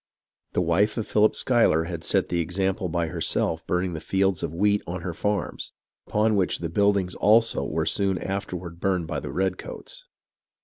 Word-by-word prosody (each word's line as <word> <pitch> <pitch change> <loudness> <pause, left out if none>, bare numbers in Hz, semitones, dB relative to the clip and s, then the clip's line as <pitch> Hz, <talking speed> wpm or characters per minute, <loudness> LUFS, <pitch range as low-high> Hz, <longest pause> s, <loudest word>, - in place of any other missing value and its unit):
The 90 - +1
wife 100 +7 +2
of 110 - -1
Philip 105 +1 +3
Schuyler 115 -10 +3
had 85 -1 -6
set - - +1
the 85 - 0
example 95 +3 -1
by 85 0 0
herself 80 -1 -1
burning 90 0 0
the 80 - -4
fields 95 0 0
of - - -3
wheat 105 +4 +2
on 90 +1 -4
her 85 -1 -4
farms, 105 +4 -3 0.3
upon 110 +1 +2
which 95 -2 +1
the 85 - -4
buildings 100 0 +2
also 115 +2 +3
were - - -1
soon 95 -2 +1
afterward 90 -3 -5
burned 95 -3 0
by - - -3
the - - -7
redcoats. 95 - -4
95 Hz, 175 wpm, -25 LUFS, 85-105 Hz, 0.3 s, Philip